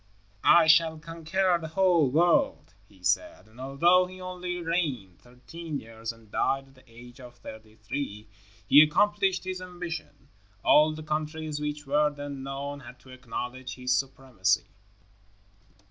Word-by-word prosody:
"I 170 -1 +7
shall 160 0 +4
conquer 170 +3 0
the 160 - -5
whole 170 -4 +3
world," 165 - +2 0.2
he 95 -3 -22
said, 95 +2 0
and 110 +3 -19
although 170 +7 +3
he 185 0 -12
only 180 -1 -5
reigned 150 - -2
thirteen 135 +6 -8
years 115 0 -7
and 115 -2 -19
died 135 0 0
at - - -22
the 130 - -21
age 120 +2 -14
of 125 -1 -12
thirty 110 -2 -12
three, 110 -1 -5 0.4
he 145 - +8
accomplished 190 +4 +2
his 185 0 -5
ambition. 175 -6 -8 0.3
All 155 +1 +5
the 155 - -8
countries 155 0 -3
which 150 0 -4
were 150 +2 +2
then 145 -1 -7
known 140 +1 -5
had 130 -1 -12
to 130 - -16
acknowledge 130 0 -6
his 125 0 -1
supremacy. 125 -7 0
145 Hz, 145 wpm, -27 LUFS, 125-165 Hz, 0.4 s, he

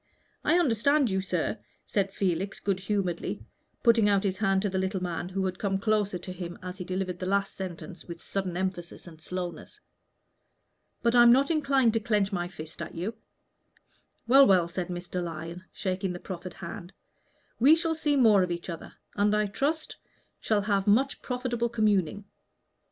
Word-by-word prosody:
"I 340 - +4
understand 280 - +3
you, 190 0 +1
sir," 185 +2 -2 0.3
said 195 -2 0
Felix, 190 0 -1
good 195 -2 -1
humoredly, 190 -3 -2 0.4
putting 230 -3 +5
out 200 -1 +3
his 190 -2 -1
hand 195 -2 +2
to 205 - +1
the 190 0 -1
little 190 +1 -1
man, 175 0 -3
who 190 0 -1
had 185 0 -3
come 195 -2 0
close 210 0 +1
to 185 - -7
him 175 -1 -6
as 185 +1 -7
he - - -3
delivered 185 0 -3
the 185 - -3
last 200 +1 +1
sentence 185 -1 -7
with 170 -1 -7
sudden 185 -2 -3
emphasis 185 -2 -4
and 160 -3 -13
slowness. 180 - -6 1.2
"But 235 -1 +3
I'm 240 -1 +8
not 275 +5 +4
inclined 275 -7 +3
to 225 - +2
clench 210 -2 +1
my 175 -1 -1
fist 160 -3 -9
at 170 - -6
you." 185 +7 -3 1.1
"Well, 270 +3 +8
well," 180 -3 +4
said 175 0 -4
Mr. 180 0 -4
Lyon, 165 +2 -6
shaking 190 -1 -2
the 175 - -6
proffered 180 -1 -7
hand, 175 +1 -8 0.7
"we 280 +7 +7
shall 330 0 0
see 300 -2 +1
more 220 -7 +6
of 180 - 0
each 170 +1 -4
other, 165 - -8 0.2
and 205 +1 +2
I 210 0 +2
trust 290 +10 -2 0.4
shall 215 -2 +1
have 200 -1 0
much 260 +7 +3
profitable 245 -2 -2
communing. 205 -4 +1
195 Hz, 175 wpm, -28 LUFS, 180-225 Hz, 1.2 s, I'm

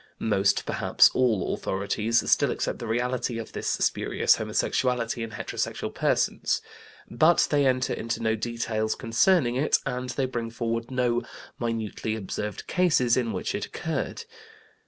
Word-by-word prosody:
Most, 100 -2 +1
perhaps - - +4
all, 120 -7 +1
authorities 105 +4 0
still - - +4
accept - - -2
the 115 - -5
reality 120 +1 -1
of 115 - -6
this - - -3
spurious - - +2
homosexuality 120 -2 0
in 115 - -3
heterosexual 105 - -4
persons. - - +1 0.5
But 155 +8 +4
they 145 -2 +3
enter 130 0 +1
into 115 0 -3
no 110 -1 +1
details 110 -1 -2
concerning 125 +2 +2
it, 145 +3 +3
and 125 -2 -3
they 130 +2 -1
bring 120 -3 -3
forward 115 0 -3
no 125 -2 +1 0.4
minutely 110 -2 -2
observed 105 0 -5
cases 155 -10 +3
in 120 -3 0
which 95 - -3
it - - -2
occurred. - - -4
115 Hz, 140 wpm, -26 LUFS, 110-125 Hz, 0.5 s, perhaps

